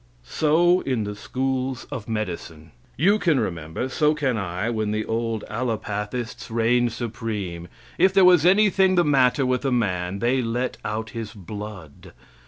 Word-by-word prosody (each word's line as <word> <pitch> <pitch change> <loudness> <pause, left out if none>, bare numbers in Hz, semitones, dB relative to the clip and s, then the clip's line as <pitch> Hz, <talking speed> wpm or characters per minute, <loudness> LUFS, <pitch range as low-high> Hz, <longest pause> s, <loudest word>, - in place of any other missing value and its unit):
So 170 - +3
in 125 -5 -1
the 105 0 -5
schools 130 +2 -2
of 110 -1 -6
medicine. 85 -7 -5 0.3
You 200 +8 +3
can 160 -8 +2
remember, 85 +1 -3
so 150 +3 +2
can 135 -5 0
I, 95 0 -3
when 110 -2 -1
the 110 +1 -1
old 115 -1 -2
alopathists 110 0 -4
reigned 120 +1 +2
supreme. 105 -7 -5 0.3
If 190 +2 +5
there 190 -1 +5
was 180 -4 +6
anything 190 0 +4
the 175 - +4
matter 135 -1 +3
with 125 +1 0
a 135 - 0
man, 95 -6 0
they 125 +5 +1
let 120 +2 -2
out 110 +1 -4
his 110 -2 -6
blood. 100 -5 -9
115 Hz, 155 wpm, -24 LUFS, 105-135 Hz, 0.3 s, was